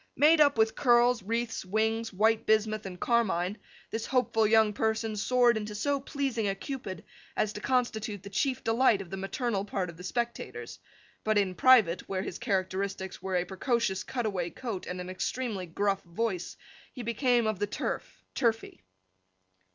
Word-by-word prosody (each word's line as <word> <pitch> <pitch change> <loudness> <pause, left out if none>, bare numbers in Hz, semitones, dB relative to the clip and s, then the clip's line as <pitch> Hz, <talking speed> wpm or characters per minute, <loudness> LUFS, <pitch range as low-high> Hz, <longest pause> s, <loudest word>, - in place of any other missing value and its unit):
Made 305 +2 +6
up 285 -4 +5
with 220 0 +3
curls, 240 -1 +4
wreaths, 230 +3 -2
wings, 220 +3 0
white 220 +3 +2
bismuth, 215 -1 +2
and 180 -1 -8
carmine, 210 -4 +1 0.3
this 225 0 -3
hopeful 225 -4 +2
young 220 -1 +4
person 220 +1 -1
soared 240 +2 +3
into 210 -1 -5
so 280 +6 0
pleasing 265 -6 -2
a 195 - 0
Cupid 195 - -6 0.3
as 215 0 +1
to 210 - -7
constitute 220 -6 -1
the 200 - -9
chief 255 +7 0
delight 225 -2 +3
of 175 - -16
the 195 - -4
maternal 200 +1 -2
part 195 -3 -3
of 165 - -17
the 180 - -10
spectators; 235 +5 -4 0.4
but 215 0 +2
in 195 -2 +2
private, 220 -5 +4
where 190 -1 -1
his 180 - -6
characteristics 190 -2 -2
were 190 -1 -2
a 180 0 +1
precocious 195 +1 0
cutaway 205 -9 -2
coat 220 -2 -6
and 180 0 -4
an 180 0 -6
extremely 200 -1 -3
gruff 195 +3 0
voice, 185 +1 -3 0.3
he 250 - -7
became 235 +1 +2
of 215 -3 -1
the 205 - 0
Turf, 205 - -4
turfy. 225 - -1
215 Hz, 165 wpm, -29 LUFS, 195-240 Hz, 0.4 s, Made